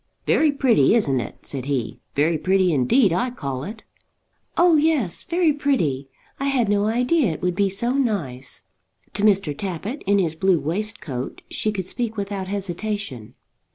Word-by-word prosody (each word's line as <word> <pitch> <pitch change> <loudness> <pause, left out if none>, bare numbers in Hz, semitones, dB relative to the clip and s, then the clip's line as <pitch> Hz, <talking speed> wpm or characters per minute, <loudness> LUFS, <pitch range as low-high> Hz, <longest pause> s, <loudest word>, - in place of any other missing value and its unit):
"Very 310 -2 +4
pretty; 260 -5 +4
isn't 140 - +2
it?" 115 - -7
said 135 -3 -5
he. 135 -5 -2 0.2
"Very 155 +4 +2
pretty 185 0 +2
indeed, 165 - +3
I 220 +9 +1
call 140 - -5
it." 220 +6 -7 0.7
"Oh 350 -1 +6
yes, 295 - +2
very 340 -3 +2
pretty. 165 - 0 0.3
I 275 - -1
had 260 -6 +1
no 205 0 +2
idea 245 - +2
it - - -8
would 180 0 +1
be 200 +2 +1
so 235 +6 0
nice." 180 - -2 0.5
To 205 - -1
Mr. 195 -8 +3
Tappitt 195 - -4
in 200 0 +4
his 170 -5 +1
blue 185 +1 +2
waistcoat 160 - -4
she 215 - 0
could 190 -3 -3
speak 225 +3 -3
without 200 -1 -3
hesitation. 195 - -4
200 Hz, 160 wpm, -23 LUFS, 160-240 Hz, 0.7 s, Oh